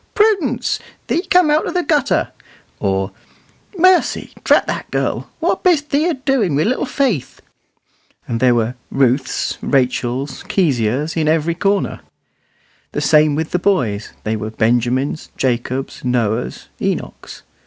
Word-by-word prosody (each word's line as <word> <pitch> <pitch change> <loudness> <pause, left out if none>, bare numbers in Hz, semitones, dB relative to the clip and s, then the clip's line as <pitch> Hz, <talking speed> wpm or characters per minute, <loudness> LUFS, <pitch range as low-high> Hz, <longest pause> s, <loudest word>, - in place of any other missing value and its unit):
Prudence! 345 - +2 0.3
thee 340 - 0
cum' 360 -6 +5
out 305 +1 +2
o' - - -1
the 360 -1 0
gutter;" 295 -6 +1 0.5
or, 95 0 0 0.7
"Mercy! 370 +1 +3
drat - - +4
the - - -3
girl, - - -2
what - - 0
bist 315 -5 +2
thee 295 +4 +2
a 345 - 0
doin' 260 - 0
wi' 150 - +2
little 255 +4 0
Faith?" 250 - -1 0.9
and 115 - -2
there 125 -1 +4
were 115 +1 0 0.2
Ruths, 130 0 0
Rachels, 130 0 0
Keziahs, 140 - 0
in 160 -2 0
every 160 +1 +2
corner. 195 +3 0 0.9
The 145 - -1
same 150 -1 +4
with 160 +1 -2
the 180 - +1
boys: 120 - 0
they 110 +1 -1
were 110 0 -4
Benjamins, 120 +6 0
Jacobs, 130 +1 -2
Noahs, 120 -2 -1
Enochs. - - -4
150 Hz, 135 wpm, -18 LUFS, -, 0.9 s, cum